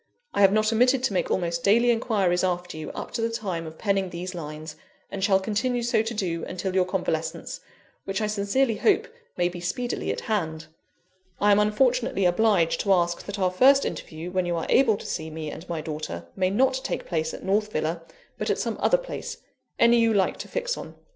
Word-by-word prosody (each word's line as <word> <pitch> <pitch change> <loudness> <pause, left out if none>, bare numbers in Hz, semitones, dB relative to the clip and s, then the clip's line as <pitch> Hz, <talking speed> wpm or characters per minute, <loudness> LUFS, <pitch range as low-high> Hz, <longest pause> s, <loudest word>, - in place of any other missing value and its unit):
I - - +1
have 195 -1 +7
not 215 +2 +2
omitted 250 +3 +3
to 235 - +1
make 185 - 0
almost 170 -2 -1
daily 235 +4 +5
inquiries 200 -7 +1
after 180 -2 -1
you, 155 0 -6
up - - -6
to 235 - -3
the 230 - +1
time 190 -8 -3
of 160 0 -10
penning 195 -3 0
these 180 +2 -6
lines, 155 -2 -7 0.4
and 195 - -4
shall 195 -1 +4
continue 235 +5 -1
so 235 -2 +2
to 225 +1 -3
do 170 -5 -2
until 185 +1 -4
your 185 -1 +3
convalescence, 165 -3 -3 0.5
which 195 +1 -2
I 215 - 0
sincerely 210 +4 +1
hope 435 +2 +2 0.3
may 175 -1 +2
be 175 0 -6
speedily 240 +8 -2
at - - -4
hand; 165 -7 -2 0.7
I 205 0 +4
am 200 - +5
unfortunately 225 -1 +2
obliged 180 -2 +3
to 200 - +3
ask 175 -1 +1
that 200 +1 -4
our 185 -2 +1
first 270 +9 +5
interview, 165 +3 -5
when 185 -1 0
you 175 - 0
are 165 - -2
able 235 -6 +4
to - - -10
see 160 0 -4
me 155 -1 -5
and 175 - -10
my 165 -2 -2
daughter, 150 - -5
may 185 -1 +1
not 260 +6 +2
take - - -3
place 160 -2 -1
at - - -9
North 210 +2 +1
Villa, 160 +1 -2 0.4
but - - -2
at - - +1
some - - -2
other - - +4
place, - - -6 0.4
any 235 0 +5
you 230 -1 +3
like 190 -2 +2
to - - -6
fix - - -2
on. - - -8
195 Hz, 215 wpm, -25 LUFS, 175-225 Hz, 0.7 s, have